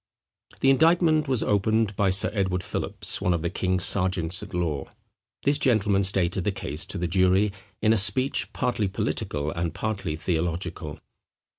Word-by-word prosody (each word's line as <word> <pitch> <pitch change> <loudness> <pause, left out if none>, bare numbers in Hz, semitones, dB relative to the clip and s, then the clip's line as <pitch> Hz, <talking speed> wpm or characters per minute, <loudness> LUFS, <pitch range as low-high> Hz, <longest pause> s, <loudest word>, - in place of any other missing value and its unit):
The 135 - +5
indictment 160 +1 +3
was 130 -4 +1
opened 105 +1 +1
by 100 -1 +2
Sir 95 +2 +2
Edward 95 -3 -1
Philips, - - -2
one 90 -1 +2
of 85 - -4
the 85 - -1
king's 95 -1 -1
sergeants 90 -2 +1
at 105 - -9
law. 80 -6 -2 0.6
This 145 +1 +2
gentleman 105 -7 +2
stated 95 -1 +2
the 105 - 0
case 75 -5 -4
to - - -5
the 90 -1 -1
jury 95 +3 +3 0.3
in 110 0 +5
a - - +2
speech 130 +7 +1
partly 120 -5 -1
political 75 -5 -3
and 85 0 -3
partly 100 -7 -3
theological. 85 -1 -3
95 Hz, 160 wpm, -25 LUFS, 85-110 Hz, 0.6 s, The